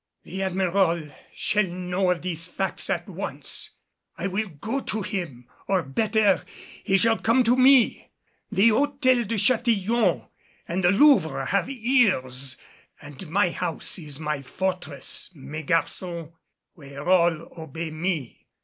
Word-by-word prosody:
"The 190 Hz, +2 st, -6 dB
Admiral 185 Hz, -4 st, +1 dB, 0.2 s
shall 210 Hz, -2 st, +1 dB
know 180 Hz, +1 st, -1 dB
of 180 Hz, -1 st, 0 dB
these 165 Hz, -2 st, -1 dB
facts 190 Hz, +1 st, -2 dB
at -, -, -1 dB
once. -, -, -4 dB, 0.5 s
I -, -, -4 dB
will 195 Hz, +3 st, -1 dB
go 210 Hz, -, -4 dB
to 220 Hz, -5 st, -3 dB
him 170 Hz, -, -5 dB, 0.2 s
or 190 Hz, -3 st, +1 dB
better 210 Hz, +6 st, +2 dB, 0.4 s
he 195 Hz, -, +3 dB
shall 225 Hz, +2 st, +3 dB
come 235 Hz, +3 st, +3 dB
to 240 Hz, +1 st, +3 dB
me. 260 Hz, -1 st, +4 dB, 0.4 s
The 205 Hz, +5 st, +5 dB
Hôtel 255 Hz, -1 st, +2 dB
de 230 Hz, -, -1 dB
Châtillon 225 Hz, 0 st, +2 dB, 0.4 s
and 180 Hz, +2 st, -2 dB
the 175 Hz, -, +5 dB
Louvre 205 Hz, -, +4 dB
have 200 Hz, +1 st, 0 dB
ears 185 Hz, -, +1 dB, 0.4 s
and 150 Hz, +3 st, -9 dB
my 185 Hz, +1 st, +2 dB
house 170 Hz, +1 st, -3 dB
is 150 Hz, -4 st, -7 dB
my 150 Hz, -2 st, -2 dB
fortress, 180 Hz, -1 st, -3 dB
mes 150 Hz, +2 st, -7 dB
garçons, 165 Hz, 0 st, -2 dB, 0.4 s
where 140 Hz, -2 st, -10 dB
all 170 Hz, -3 st, +3 dB
obey 160 Hz, +1 st, -6 dB
me. 155 Hz, -5 st, -4 dB
185 Hz, 135 wpm, -25 LUFS, 160-215 Hz, 0.5 s, The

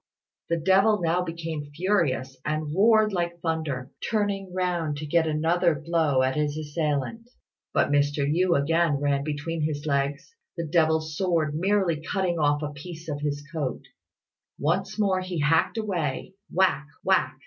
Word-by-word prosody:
The 170 Hz, -, +1 dB
devil 195 Hz, +5 st, +4 dB
now 170 Hz, +1 st, +1 dB
became 165 Hz, -4 st, -5 dB
furious, 155 Hz, -8 st, 0 dB
and 155 Hz, 0 st, -2 dB
roared 215 Hz, +2 st, +4 dB
like 170 Hz, -1 st, -2 dB
thunder, 155 Hz, -6 st, -2 dB, 0.2 s
turning 200 Hz, -3 st, -1 dB
round 175 Hz, -5 st, -1 dB
to 155 Hz, -, -5 dB
get 160 Hz, +2 st, +2 dB
another 165 Hz, +2 st, +2 dB
blow 155 Hz, -4 st, +1 dB
at 130 Hz, 0 st, +1 dB
his 150 Hz, 0 st, 0 dB
assailant. 155 Hz, -, -2 dB, 0.4 s
But -, -, +2 dB
Mr. 145 Hz, 0 st, +2 dB
Yü 170 Hz, +1 st, +2 dB
again 165 Hz, +2 st, +2 dB
ran 140 Hz, 0 st, 0 dB
between 155 Hz, +2 st, -3 dB
his 150 Hz, -1 st, -2 dB
legs, 140 Hz, -, -1 dB, 0.2 s
the 170 Hz, -, -2 dB
devil's 155 Hz, -1 st, +1 dB
sword 165 Hz, -4 st, +1 dB
merely 180 Hz, -1 st, +1 dB
cutting 175 Hz, +1 st, -1 dB
off 145 Hz, 0 st, +2 dB
a 150 Hz, -, -3 dB
piece 165 Hz, +3 st, -9 dB
of 145 Hz, -2 st, -4 dB
his 145 Hz, -1 st, -2 dB
coat. 145 Hz, -6 st, -3 dB, 0.7 s
Once 190 Hz, +7 st, -1 dB
more 195 Hz, -3 st, +2 dB
he 185 Hz, -2 st, -4 dB
hacked 160 Hz, +8 st, +2 dB
away 185 Hz, -7 st, -2 dB, 0.2 s
whack! 165 Hz, -5 st, +2 dB, 0.2 s
whack! 130 Hz, -9 st, +2 dB
160 Hz, 150 wpm, -26 LUFS, 145-180 Hz, 0.7 s, devil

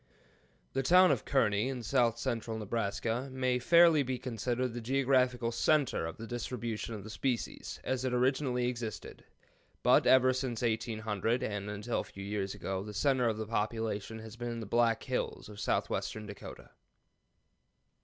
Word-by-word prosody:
The 135 Hz, -, +1 dB
town 180 Hz, +6 st, +6 dB
of -, -, -1 dB
Kearney, 110 Hz, -3 st, +2 dB
in 130 Hz, -3 st, -4 dB
south 120 Hz, -1 st, +2 dB
central 115 Hz, -2 st, -2 dB
Nebraska, 115 Hz, +4 st, -2 dB
may 130 Hz, -1 st, 0 dB
fairly 170 Hz, +2 st, +6 dB
be 130 Hz, -1 st, -2 dB
considered 125 Hz, 0 st, -2 dB
the 120 Hz, -, -5 dB
geographical 125 Hz, -1 st, +2 dB
center 140 Hz, -, +2 dB
of 80 Hz, -, -7 dB
distribution 120 Hz, -2 st, -4 dB
of 100 Hz, -, -8 dB
the 110 Hz, -, -9 dB
species, 125 Hz, 0 st, -3 dB
as 130 Hz, -1 st, -1 dB
it 130 Hz, -, 0 dB
originally 125 Hz, 0 st, +1 dB
existed, 120 Hz, -3 st, -5 dB, 0.6 s
but -, -, +5 dB
ever 130 Hz, 0 st, +6 dB
since 125 Hz, -3 st, -3 dB
1800, 110 Hz, 0 st, -1 dB
and 105 Hz, -3 st, -3 dB
until 105 Hz, +3 st, -2 dB
a -, -, -2 dB
few 100 Hz, -, -10 dB
years 100 Hz, -1 st, -3 dB
ago, 95 Hz, -1 st, -3 dB
the 105 Hz, +1 st, -8 dB
center 130 Hz, 0 st, +2 dB
of 110 Hz, -1 st, -3 dB
population 110 Hz, -1 st, -2 dB
has 110 Hz, 0 st, -9 dB
been 120 Hz, 0 st, -4 dB
in 115 Hz, -, -5 dB
the 110 Hz, -, -5 dB
Black 115 Hz, +2 st, +2 dB
Hills -, -, -3 dB
of 105 Hz, -1 st, -10 dB
southwestern 110 Hz, 0 st, -1 dB
Dakota. 105 Hz, -1 st, -10 dB
120 Hz, 155 wpm, -32 LUFS, 110-130 Hz, 0.6 s, town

